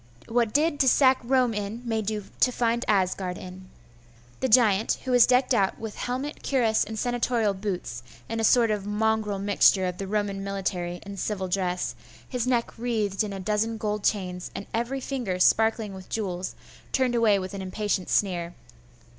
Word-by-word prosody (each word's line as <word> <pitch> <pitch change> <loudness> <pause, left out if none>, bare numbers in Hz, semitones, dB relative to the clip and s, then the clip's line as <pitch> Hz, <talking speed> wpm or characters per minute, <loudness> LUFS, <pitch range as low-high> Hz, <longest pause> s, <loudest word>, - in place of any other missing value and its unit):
What 230 -1 +1
did 295 +2 +1
to 265 - +4
sack 260 0 +5
Rome 250 -1 +2
in, 210 +3 -4
may 225 -2 0
do 210 0 -3 0.2
to 250 - +4
find 235 0 0
Asgard 185 -2 0
in.' 185 0 -10 0.7
The 260 - 0
giant, 220 -3 +4
who 260 - -2
was 245 -1 +6
decked 255 +1 +3
out 195 -5 +1
with 220 -2 -6
helmet, 260 +5 -4
cuirass, 235 -5 +2
and 220 - -6
senatorial 240 -3 0
boots, 190 - -4 0.3
in 225 - -3
a - - -1
sort 230 0 +4
of 205 -1 -2
mongrel 215 -1 0
mixture 195 -1 +3
of 180 -1 -3
the 195 - -4
Roman 200 -1 -1
military 185 -3 -3
and 200 -1 -8
civil 190 -2 -2
dress, 180 -6 -1 0.3
his 250 -1 -2
neck 235 -2 0
wreathed 215 -5 -1
with 210 -2 -2
a 195 - -5
dozen 215 +3 -1
gold 210 -1 -2
chains, 180 -3 -1
and 200 - -5
every 240 +4 -2
finger 245 -10 -3
sparkling 220 +2 +3
with 190 -1 -11
jewels, 185 -4 -3 0.4
turned 260 -2 +1
away 225 -4 +4
with 185 +1 -5
an 200 - -5
impatient 190 0 -2
sneer. 175 -3 0
210 Hz, 180 wpm, -26 LUFS, 195-235 Hz, 0.7 s, was